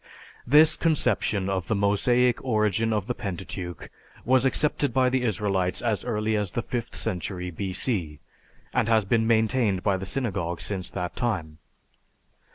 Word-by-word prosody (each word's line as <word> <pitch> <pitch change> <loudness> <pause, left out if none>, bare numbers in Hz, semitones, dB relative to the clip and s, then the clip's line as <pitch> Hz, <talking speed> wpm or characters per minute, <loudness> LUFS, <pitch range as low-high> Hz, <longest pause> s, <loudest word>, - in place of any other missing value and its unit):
This 155 +4 +6
conception 120 - +1
of 95 -3 -2
the 110 - 0
Mosaic 120 +5 +2
origin 110 -2 +1
of 105 -3 0
the 125 - -2
Pentateuch 95 -5 -6 0.3
was 130 +1 +4
accepted 145 -1 +1
by 130 -1 +4
the 130 0 0
Israelites 100 -5 0
as 110 -4 -1
early 110 -2 -1
as 105 -2 0
the 120 - -3
fifth 120 -2 -4
century 90 -3 -4
B.C. 90 - -2 0.5
and - - +1
has 110 -2 +3
been 110 +2 +1
maintained 110 -3 +2
by 100 -2 +2
the 95 +1 -6
Synagogue 90 -7 -2
since 95 -3 -4
that 90 -2 -5
time. 80 -11 -2
105 Hz, 150 wpm, -26 LUFS, 95-120 Hz, 0.5 s, This